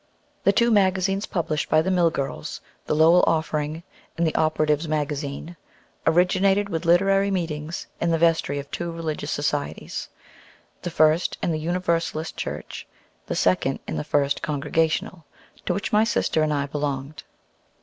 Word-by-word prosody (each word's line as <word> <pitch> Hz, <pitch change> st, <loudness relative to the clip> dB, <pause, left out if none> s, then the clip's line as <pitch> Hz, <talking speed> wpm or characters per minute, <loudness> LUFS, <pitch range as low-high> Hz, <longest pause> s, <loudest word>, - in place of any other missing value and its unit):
The -, -, +6 dB
two 235 Hz, -1 st, +3 dB
magazines 195 Hz, -1 st, +2 dB
published 160 Hz, -4 st, -2 dB
by 155 Hz, +1 st, +4 dB
the 190 Hz, -, 0 dB
mill 175 Hz, -2 st, +4 dB
girls, 140 Hz, -, -4 dB, 0.3 s
the -, -, +1 dB
"Lowell 165 Hz, +3 st, +6 dB
Offering" 155 Hz, 0 st, -1 dB, 0.3 s
and 170 Hz, -, +2 dB
the 160 Hz, -, 0 dB
"Operatives' 155 Hz, 0 st, +1 dB
Magazine," 150 Hz, +1 st, -3 dB, 0.5 s
originated 190 Hz, +4 st, +3 dB
with 165 Hz, -1 st, -3 dB
literary 195 Hz, +3 st, +4 dB
meetings 165 Hz, -4 st, -3 dB
in 170 Hz, -, +1 dB
the 165 Hz, -, +2 dB
vestry 165 Hz, -3 st, +2 dB
of 140 Hz, 0 st, -7 dB
two 170 Hz, -1 st, -3 dB
religious 160 Hz, -3 st, -4 dB
societies, 145 Hz, -1 st, -3 dB, 0.7 s
the 175 Hz, -, -3 dB
first 155 Hz, +1 st, +2 dB
in -, -, +1 dB
the 155 Hz, -, -1 dB
Universalist 165 Hz, -1 st, -1 dB
Church, -, -, -6 dB, 0.4 s
the -, -, -2 dB
second 110 Hz, +9 st, +2 dB
in -, -, -3 dB
the 75 Hz, -, -2 dB
First 140 Hz, -, +1 dB
Congregational, 160 Hz, +2 st, -1 dB, 0.4 s
to -, -, +2 dB
which 200 Hz, -, -3 dB
my 210 Hz, +1 st, +5 dB
sister 190 Hz, -7 st, +1 dB
and 155 Hz, 0 st, +1 dB
I 140 Hz, -1 st, 0 dB
belonged. 145 Hz, 0 st, -4 dB
160 Hz, 150 wpm, -24 LUFS, 150-175 Hz, 0.7 s, The